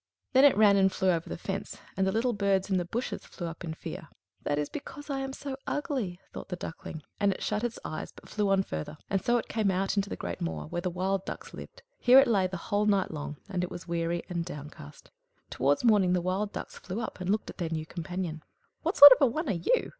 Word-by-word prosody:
Then 265 Hz, +2 st, +7 dB
it 280 Hz, -, +6 dB
ran 205 Hz, -2 st, +6 dB
and 190 Hz, 0 st, +4 dB
flew 190 Hz, 0 st, +2 dB
over 165 Hz, -1 st, -2 dB
the -, -, -4 dB
fence, 195 Hz, +3 st, -5 dB, 0.2 s
and 190 Hz, 0 st, +1 dB
the -, -, +2 dB
little 235 Hz, +4 st, +1 dB
birds 200 Hz, -1 st, +1 dB
in 190 Hz, -, +3 dB
the 175 Hz, -, -1 dB
bushes 235 Hz, +8 st, -3 dB
flew 175 Hz, -, -7 dB
up 165 Hz, 0 st, -6 dB
in 160 Hz, -2 st, -4 dB
fear. -, -, -7 dB, 0.3 s
"That 145 Hz, -, -1 dB
is 150 Hz, 0 st, 0 dB
because 290 Hz, 0 st, -8 dB
I 270 Hz, -, -1 dB
am 270 Hz, 0 st, -3 dB
so 270 Hz, 0 st, -6 dB
ugly!" 250 Hz, -12 st, -2 dB
thought -, -, -7 dB
the 180 Hz, -, -2 dB
Duckling; 160 Hz, -2 st, -7 dB, 0.2 s
and 200 Hz, -1 st, +3 dB
it 190 Hz, -, -5 dB
shut 210 Hz, +1 st, -1 dB
its 240 Hz, -1 st, -2 dB
eyes, 155 Hz, -, -5 dB
but -, -, -16 dB
flew 210 Hz, -2 st, 0 dB
on 195 Hz, -1 st, +3 dB
farther, 80 Hz, -, -5 dB
and 195 Hz, -2 st, +1 dB
so 240 Hz, 0 st, +3 dB
it 235 Hz, -, -3 dB
came 215 Hz, -3 st, 0 dB
out 195 Hz, +2 st, 0 dB
into 200 Hz, 0 st, +1 dB
the -, -, -3 dB
great 90 Hz, +1 st, -5 dB
moor, 80 Hz, -2 st, -3 dB
where 80 Hz, -, -4 dB
the 180 Hz, -, -1 dB
wild 185 Hz, +2 st, -1 dB
ducks -, -, -7 dB
lived. -, -, -10 dB, 0.2 s
Here 250 Hz, +2 st, +7 dB
it 270 Hz, 0 st, +8 dB
lay 195 Hz, -5 st, +3 dB
the 185 Hz, 0 st, -5 dB
whole 205 Hz, +4 st, 0 dB
night 200 Hz, -2 st, +2 dB
long; 150 Hz, -1 st, -5 dB
and 185 Hz, -3 st, -2 dB
it 180 Hz, -, -2 dB
was 175 Hz, -, -8 dB
weary 170 Hz, 0 st, -1 dB
and 170 Hz, -2 st, -2 dB
downcast. 150 Hz, -, -10 dB, 0.4 s
Towards 140 Hz, -, +1 dB
morning 205 Hz, -6 st, +4 dB
the 180 Hz, -, +3 dB
wild 190 Hz, +4 st, -1 dB
ducks -, -, -7 dB
flew 190 Hz, +4 st, -5 dB
up, 225 Hz, -, -5 dB
and 180 Hz, -, -3 dB
looked 210 Hz, +2 st, 0 dB
at -, -, -18 dB
their 170 Hz, -2 st, -1 dB
new 160 Hz, -1 st, -3 dB
companion. 170 Hz, -1 st, -5 dB, 0.4 s
"What 335 Hz, +5 st, -1 dB
sort 285 Hz, 0 st, +13 dB
of 260 Hz, -, +6 dB
a 275 Hz, -, +7 dB
one 310 Hz, +6 st, -2 dB
are -, -, +3 dB
you?" 185 Hz, -, +1 dB
190 Hz, 255 wpm, -29 LUFS, 170-220 Hz, 0.4 s, sort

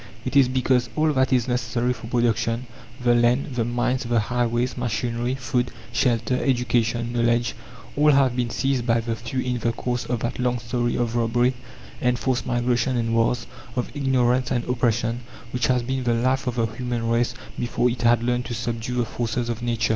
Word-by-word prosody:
It -, -, -3 dB
is 135 Hz, -2 st, +6 dB
because 130 Hz, -1 st, +1 dB
all 155 Hz, 0 st, +2 dB
that 130 Hz, 0 st, +2 dB
is 125 Hz, -2 st, +2 dB
necessary 125 Hz, 0 st, 0 dB
for 115 Hz, -2 st, -10 dB
production 120 Hz, 0 st, 0 dB, 0.4 s
the 120 Hz, -1 st, +4 dB
land, 120 Hz, +3 st, +2 dB
the 120 Hz, -2 st, 0 dB
mines, 120 Hz, +3 st, 0 dB
the 120 Hz, -1 st, +1 dB
highways, 120 Hz, +2 st, 0 dB
machinery, 120 Hz, +1 st, -1 dB
food, 125 Hz, -1 st, -1 dB, 0.2 s
shelter, 120 Hz, 0 st, +1 dB
education, 120 Hz, -2 st, +1 dB
knowledge 120 Hz, 0 st, +2 dB, 0.4 s
all 150 Hz, +1 st, +4 dB
have 135 Hz, -3 st, +4 dB
been 120 Hz, -2 st, 0 dB
seized 135 Hz, 0 st, 0 dB
by 115 Hz, 0 st, +3 dB
the 115 Hz, 0 st, -2 dB
few 115 Hz, +3 st, -3 dB
in 125 Hz, -1 st, -1 dB
the 115 Hz, -, +1 dB
course 125 Hz, +1 st, -2 dB
of 120 Hz, -2 st, -2 dB
that 120 Hz, -, -3 dB
long 125 Hz, 0 st, +1 dB
story 120 Hz, 0 st, -1 dB
of 120 Hz, -1 st, -1 dB
robbery, 120 Hz, +2 st, +2 dB, 0.5 s
enforced 125 Hz, +1 st, 0 dB
migration 120 Hz, 0 st, +1 dB
and 115 Hz, -1 st, 0 dB
wars, 115 Hz, +1 st, +1 dB, 0.3 s
of 125 Hz, +3 st, -3 dB
ignorance 130 Hz, -2 st, +2 dB
and 120 Hz, -3 st, 0 dB
oppression, 120 Hz, -1 st, 0 dB, 0.3 s
which 125 Hz, -2 st, 0 dB
has 125 Hz, -1 st, +2 dB
been 130 Hz, +1 st, -2 dB
the 120 Hz, -1 st, +2 dB
life 130 Hz, +3 st, +1 dB
of 125 Hz, -, -1 dB
the 115 Hz, -2 st, +2 dB
human 120 Hz, +1 st, -3 dB
race 120 Hz, +1 st, +1 dB, 0.2 s
before 120 Hz, 0 st, +1 dB
it 125 Hz, 0 st, -2 dB
had 120 Hz, -1 st, +4 dB
learned 125 Hz, 0 st, 0 dB
to 120 Hz, -, -4 dB
subdue 115 Hz, +1 st, -3 dB
the 120 Hz, -1 st, +1 dB
forces 120 Hz, +1 st, -2 dB
of 120 Hz, 0 st, -3 dB
Nature. 120 Hz, -2 st, 0 dB
120 Hz, 190 wpm, -24 LUFS, 115-125 Hz, 0.5 s, is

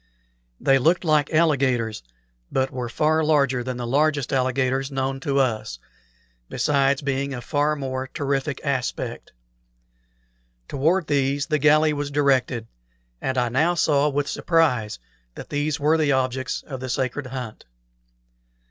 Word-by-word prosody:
They 135 Hz, 0 st, +3 dB
looked 165 Hz, +8 st, +2 dB
like 150 Hz, -2 st, +2 dB
alligators, 135 Hz, -9 st, +1 dB, 0.5 s
but 130 Hz, 0 st, 0 dB
were 125 Hz, -2 st, -4 dB
far 155 Hz, +5 st, +1 dB
larger 140 Hz, -5 st, +2 dB
than 130 Hz, 0 st, -4 dB
the 120 Hz, -, -4 dB
largest 145 Hz, +2 st, +1 dB
alligators 130 Hz, +1 st, 0 dB
known 135 Hz, -1 st, -2 dB
to 140 Hz, +1 st, -1 dB
us, 110 Hz, -, 0 dB, 0.7 s
besides 140 Hz, -1 st, +1 dB
being 140 Hz, 0 st, -2 dB
of 120 Hz, -, -7 dB
far 150 Hz, +3 st, +1 dB
more 130 Hz, -2 st, -4 dB
terrific 140 Hz, 0 st, -2 dB
aspect. 130 Hz, -3 st, -3 dB, 1.4 s
Toward 165 Hz, +6 st, +1 dB
these 140 Hz, -1 st, 0 dB
the 150 Hz, -1 st, 0 dB
galley 155 Hz, +1 st, +4 dB
was 145 Hz, -1 st, -3 dB
directed, 135 Hz, -5 st, +1 dB, 0.6 s
and 130 Hz, 0 st, -2 dB
I 120 Hz, -1 st, +1 dB
now 160 Hz, +8 st, +2 dB
saw 150 Hz, -3 st, +2 dB
with 145 Hz, 0 st, -1 dB
surprise 135 Hz, -, +1 dB, 0.4 s
that -, -, -9 dB
these 150 Hz, +1 st, -1 dB
were 155 Hz, +3 st, +2 dB
the 145 Hz, -3 st, +2 dB
objects 130 Hz, 0 st, -1 dB
of 130 Hz, -3 st, -7 dB
the 130 Hz, 0 st, -6 dB
sacred 130 Hz, +2 st, -2 dB
hunt. 125 Hz, -4 st, -7 dB
140 Hz, 140 wpm, -23 LUFS, 130-150 Hz, 1.4 s, galley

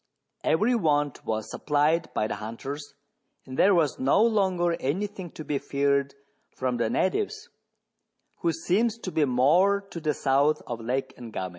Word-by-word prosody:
Every 210 Hz, +11 st, +2 dB
want 145 Hz, -, +1 dB
was 110 Hz, -1 st, -2 dB
supplied 150 Hz, +3 st, +1 dB
by -, -, +1 dB
the 110 Hz, -, -3 dB
hunters, 135 Hz, +7 st, -7 dB, 0.5 s
and 130 Hz, -, -8 dB
there 195 Hz, +7 st, +5 dB
was 155 Hz, -5 st, +1 dB
no 135 Hz, +11 st, +4 dB
longer 190 Hz, -6 st, +2 dB
any 160 Hz, +10 st, -1 dB
thing 195 Hz, -4 st, -8 dB
to 155 Hz, -, -7 dB
be 145 Hz, -2 st, -1 dB
feared 140 Hz, 0 st, 0 dB, 0.4 s
from 125 Hz, -2 st, -1 dB
the 115 Hz, -2 st, 0 dB
natives, 425 Hz, -, -1 dB, 0.9 s
who 170 Hz, -, 0 dB
seemed 215 Hz, +8 st, 0 dB
to 185 Hz, -, -3 dB
be 155 Hz, -3 st, +2 dB
more 155 Hz, +11 st, +4 dB
to 170 Hz, -, -5 dB
the 155 Hz, -2 st, -1 dB
south 140 Hz, +3 st, +2 dB
of 120 Hz, -1 st, -5 dB
Lake 130 Hz, +3 st, -2 dB
Ngami. 110 Hz, -6 st, -5 dB
150 Hz, 160 wpm, -26 LUFS, 130-185 Hz, 0.9 s, there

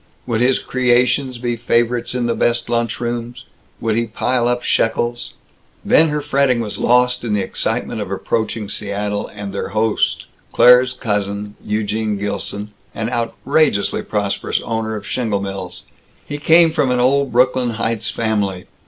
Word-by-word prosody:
Would 115 Hz, -2 st, -1 dB
his 125 Hz, +1 st, +3 dB
creations 125 Hz, +1 st, +1 dB
be 120 Hz, 0 st, -2 dB
favorites 120 Hz, +1 st, 0 dB
in 125 Hz, -1 st, 0 dB
the 120 Hz, -, +1 dB
best 120 Hz, 0 st, 0 dB
lunch 120 Hz, 0 st, -1 dB
rooms? 120 Hz, 0 st, -4 dB, 0.3 s
Would 115 Hz, -2 st, 0 dB
he 115 Hz, +1 st, 0 dB
pile 120 Hz, +2 st, 0 dB
up 125 Hz, 0 st, 0 dB
shekels? 120 Hz, +1 st, 0 dB, 0.5 s
Then 160 Hz, 0 st, +5 dB
her 150 Hz, 0 st, -1 dB
fretting 140 Hz, -4 st, +2 dB
was 110 Hz, -3 st, -4 dB
lost 125 Hz, 0 st, +3 dB
in 115 Hz, -3 st, -1 dB
the 100 Hz, -, 0 dB
excitement 105 Hz, +3 st, -2 dB
of 100 Hz, -, -5 dB
approaching 110 Hz, +2 st, -2 dB
Seattle 105 Hz, 0 st, -3 dB
and 100 Hz, -1 st, -7 dB
their 100 Hz, -, -3 dB
host 110 Hz, 0 st, +1 dB, 0.3 s
Claire's 125 Hz, +1 st, +6 dB
cousin, 105 Hz, -2 st, -2 dB
Eugene 105 Hz, 0 st, -1 dB
Gilson, 105 Hz, +1 st, -4 dB, 0.2 s
an 115 Hz, +1 st, -3 dB
outrageously 120 Hz, 0 st, +1 dB
prosperous 100 Hz, -2 st, -1 dB
owner 110 Hz, -1 st, -3 dB
of 105 Hz, -1 st, -7 dB
shingle 110 Hz, -5 st, -1 dB
mills. 95 Hz, -2 st, -6 dB, 0.4 s
He 145 Hz, 0 st, -5 dB
came 165 Hz, +2 st, +5 dB
from 150 Hz, -5 st, +1 dB
an 125 Hz, 0 st, +1 dB
old 135 Hz, +2 st, +2 dB
Brooklyn 125 Hz, 0 st, +2 dB
Heights 115 Hz, 0 st, -1 dB
family. 100 Hz, -5 st, -1 dB
115 Hz, 155 wpm, -19 LUFS, 105-125 Hz, 0.5 s, Claire's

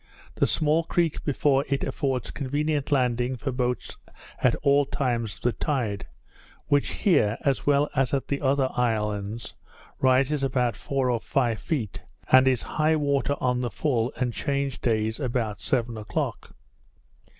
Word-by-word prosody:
The -, -, +1 dB
small 155 Hz, +1 st, +2 dB
creek 170 Hz, -2 st, 0 dB
before 140 Hz, -1 st, +2 dB
it 140 Hz, -1 st, 0 dB
affords 130 Hz, -5 st, -2 dB
convenient 145 Hz, +1 st, -1 dB
landing 125 Hz, -2 st, +1 dB
for 120 Hz, +4 st, -3 dB
boats 125 Hz, -1 st, -2 dB, 0.4 s
at -, -, +3 dB
all 140 Hz, +1 st, +5 dB
times 115 Hz, -6 st, -1 dB
of -, -, -19 dB
the 120 Hz, -, +2 dB
tide; 115 Hz, -, -2 dB, 0.6 s
which 145 Hz, 0 st, +2 dB
here, 130 Hz, -, +2 dB
as 140 Hz, 0 st, 0 dB
well 145 Hz, 0 st, +4 dB
as 135 Hz, -1 st, +2 dB
at 135 Hz, -2 st, -1 dB
the 140 Hz, -, -2 dB
other 135 Hz, -1 st, +2 dB
islands, 105 Hz, -2 st, -1 dB, 0.5 s
rises 135 Hz, +2 st, +3 dB
about 125 Hz, -4 st, +1 dB
four 135 Hz, 0 st, -1 dB
or 120 Hz, -, 0 dB
five 120 Hz, -2 st, 0 dB
feet, 125 Hz, -, -3 dB, 0.3 s
and 130 Hz, 0 st, +7 dB
is 130 Hz, -3 st, +2 dB
high 155 Hz, +1 st, +1 dB
water 140 Hz, -2 st, +1 dB
on 125 Hz, -1 st, +1 dB
the 120 Hz, -, -1 dB
full 125 Hz, -3 st, 0 dB
and 125 Hz, -2 st, -1 dB
change 140 Hz, 0 st, -2 dB
days 110 Hz, -1 st, 0 dB
about 120 Hz, -5 st, -2 dB
seven 120 Hz, -3 st, 0 dB
o'clock. 105 Hz, -, -4 dB
130 Hz, 150 wpm, -26 LUFS, 120-140 Hz, 0.6 s, and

